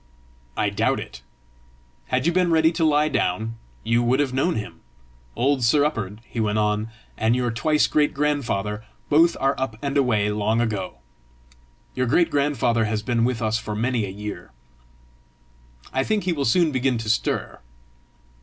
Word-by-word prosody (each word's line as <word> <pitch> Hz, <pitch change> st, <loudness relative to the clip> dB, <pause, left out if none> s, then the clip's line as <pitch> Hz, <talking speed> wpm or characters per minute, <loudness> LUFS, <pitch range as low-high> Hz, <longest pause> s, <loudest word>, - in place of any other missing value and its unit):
"I -, -, +1 dB
doubt -, -, +1 dB
it. -, -, -9 dB, 0.9 s
Had -, -, 0 dB
you 170 Hz, -, +3 dB
been 180 Hz, -1 st, +2 dB
ready 160 Hz, 0 st, +4 dB
to 165 Hz, -1 st, -1 dB
lie 150 Hz, -1 st, +3 dB
down, 110 Hz, -4 st, -1 dB, 0.3 s
you 115 Hz, +1 st, +2 dB
would 125 Hz, +3 st, +2 dB
have 140 Hz, -3 st, 0 dB
known 140 Hz, +7 st, +1 dB
him! 105 Hz, -, -6 dB, 0.6 s
Old 135 Hz, +1 st, +1 dB
Sir 145 Hz, +6 st, +4 dB
Up'ard," 110 Hz, -8 st, -3 dB
he 120 Hz, -, -6 dB
went 105 Hz, -1 st, 0 dB
on, 105 Hz, +1 st, 0 dB, 0.3 s
"and 110 Hz, +2 st, +2 dB
your 125 Hz, -1 st, 0 dB
twice 150 Hz, +7 st, +2 dB
great 150 Hz, -1 st, +2 dB
grandfather, 115 Hz, -8 st, -1 dB, 0.3 s
both 165 Hz, +3 st, +4 dB
are 135 Hz, +1 st, +2 dB
up 130 Hz, -4 st, -2 dB
and 140 Hz, +1 st, -3 dB
away 110 Hz, -6 st, +2 dB
long 105 Hz, +2 st, 0 dB
ago. 105 Hz, -, -2 dB, 1.0 s
Your 130 Hz, -1 st, -1 dB
great 170 Hz, +7 st, +3 dB
grandfather 125 Hz, -5 st, +1 dB
has 105 Hz, 0 st, -2 dB
been 115 Hz, -1 st, +1 dB
with 125 Hz, -2 st, -1 dB
us 110 Hz, +1 st, 0 dB
for 105 Hz, -1 st, -5 dB
many 120 Hz, +1 st, 0 dB
a -, -, -6 dB
year; 100 Hz, -2 st, -7 dB, 1.4 s
I 130 Hz, -, +1 dB
think 215 Hz, +4 st, 0 dB
he 180 Hz, -1 st, 0 dB
will 140 Hz, -3 st, -2 dB
soon 160 Hz, +7 st, +3 dB
begin 130 Hz, -2 st, +1 dB
to 115 Hz, -1 st, -6 dB
stir. 110 Hz, -, -1 dB
120 Hz, 170 wpm, -23 LUFS, 110-145 Hz, 1.4 s, ready